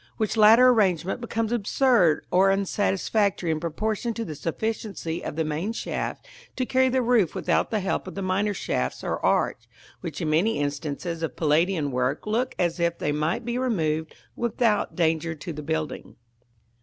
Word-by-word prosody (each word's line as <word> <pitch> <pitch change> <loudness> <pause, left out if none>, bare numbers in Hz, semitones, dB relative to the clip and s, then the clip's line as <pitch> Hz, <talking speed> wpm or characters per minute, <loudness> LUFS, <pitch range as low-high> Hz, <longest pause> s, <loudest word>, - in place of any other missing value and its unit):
Which 215 -1 -1
latter 225 +4 +7
arrangement 195 -3 +2
becomes 225 -1 -2
absurd 225 - +3
or 190 +2 +5
unsatisfactory 195 -1 +1
in 155 - -1
proportion 215 +8 -2
to 230 - -3
the 155 - -5
sufficiency 175 0 -4
of - - -5
the 160 - 0
main 160 +8 -2
shaft - - -4 0.3
to 255 - -1
carry 260 0 +3
the 255 0 +1
roof 230 -8 +2
without - - +1
the 215 -2 -1
help 190 - -2
of - - -8
the 195 - -3
minor 200 +2 0
shafts 65 - -2
or - - -3
arch, - - +1 0.3
which - - -6
in 155 - -1
many 185 +9 +2
instances 145 +3 -3
of 165 - -3
Palladian 155 0 +1
work 125 +1 -1
look 235 +4 -1
as 175 0 0
if 170 0 +1
they 150 - -1
might 155 +10 -1
be 240 +1 -2
removed 160 -11 -1 0.2
without 230 -2 0
danger 165 -1 0
to 160 +2 -7
the 150 - -6
building. 155 0 -4
185 Hz, 170 wpm, -25 LUFS, 160-225 Hz, 0.3 s, latter